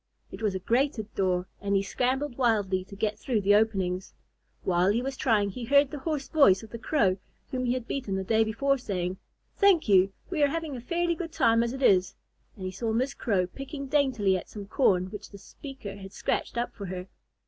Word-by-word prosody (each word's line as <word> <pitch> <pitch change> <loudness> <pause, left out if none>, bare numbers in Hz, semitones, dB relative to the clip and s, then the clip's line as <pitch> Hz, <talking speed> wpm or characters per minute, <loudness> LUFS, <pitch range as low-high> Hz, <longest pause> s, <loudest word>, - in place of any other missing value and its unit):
It - - -9
was 210 -3 0
a - - -1
grated 235 +1 0
door 185 -1 0
and 200 0 0
he 195 - +2
scrambled 260 +5 -1
wildly 205 -7 +1
to 200 - -11
get 210 +1 -2
through 230 -3 0
the 200 +1 +4
openings. 195 -4 +1 0.5
While 180 +1 +2
he 215 +3 +2
was 270 0 -3
trying, 210 -6 +2
he 240 +4 -6
heard 280 +2 +4
the 295 - -5
hoarse 295 -1 -3
voice 225 -11 +5
of 220 - -12
the 235 - -6
Crow 205 -9 +2 0.3
whom 255 -1 -1
he 245 - +2
had 250 -2 -4
beaten 245 -8 -3
the 190 - -1
day 220 +3 +3
before, 270 +6 0
saying, 185 -5 -3 0.4
"Thank 390 - +4
you, 195 -1 +5 0.2
we 325 -5 0
are 290 - +6
having 315 -1 -3
a 245 - -6
fairly 340 +6 0
good 330 -1 -5
time 230 -6 +3
as 235 0 0
it 270 +1 -5
is"; 185 -5 +4 0.4
and 190 - -7
he 185 - -3
saw 220 +4 -2
Miss 255 +5 0
Crow 195 -6 0
picking 275 +8 -7
daintily 260 -9 +2
at 185 - -5
some 205 -2 -8
corn 190 -4 +2
which 210 -1 -8
the 200 - -11
speaker 265 -1 -9
had 195 0 -10
scratched 235 - -2
up 240 +1 -2
for 200 -3 -7
her. 180 0 -5
220 Hz, 220 wpm, -28 LUFS, 195-270 Hz, 0.5 s, are